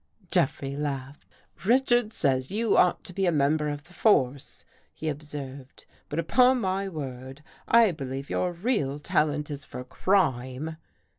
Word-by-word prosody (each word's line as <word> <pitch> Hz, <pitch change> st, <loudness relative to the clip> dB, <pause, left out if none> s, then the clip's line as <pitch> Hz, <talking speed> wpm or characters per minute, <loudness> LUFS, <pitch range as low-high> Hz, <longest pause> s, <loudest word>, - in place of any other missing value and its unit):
Jeffrey 140 Hz, -5 st, 0 dB
laughed. 140 Hz, -1 st, -5 dB, 0.2 s
" -, -, -21 dB
Richards 240 Hz, 0 st, +3 dB
says 130 Hz, -3 st, +1 dB
you 215 Hz, +1 st, +1 dB
ought 180 Hz, -, +3 dB
to 180 Hz, -, -8 dB
be 195 Hz, +1 st, 0 dB
a -, -, +4 dB
member 150 Hz, 0 st, +2 dB
of 145 Hz, 0 st, -5 dB
the 175 Hz, -, -18 dB
force," 140 Hz, -, +1 dB, 0.3 s
he 160 Hz, -, -6 dB
observed, 140 Hz, -3 st, -7 dB
" -, -, -35 dB
but 145 Hz, -, -4 dB
up 165 Hz, +8 st, -2 dB
on 250 Hz, 0 st, +6 dB
my 195 Hz, -1 st, -1 dB
word, 135 Hz, -3 st, -7 dB, 0.2 s
I 230 Hz, -3 st, +6 dB
believe 135 Hz, -3 st, -5 dB
your 180 Hz, -, -1 dB
real 170 Hz, -, -1 dB
talent 150 Hz, 0 st, 0 dB
is 145 Hz, -1 st, -5 dB
for 125 Hz, -, -8 dB
crime." 145 Hz, -2 st, 0 dB
150 Hz, 160 wpm, -27 LUFS, 135-190 Hz, 0.3 s, on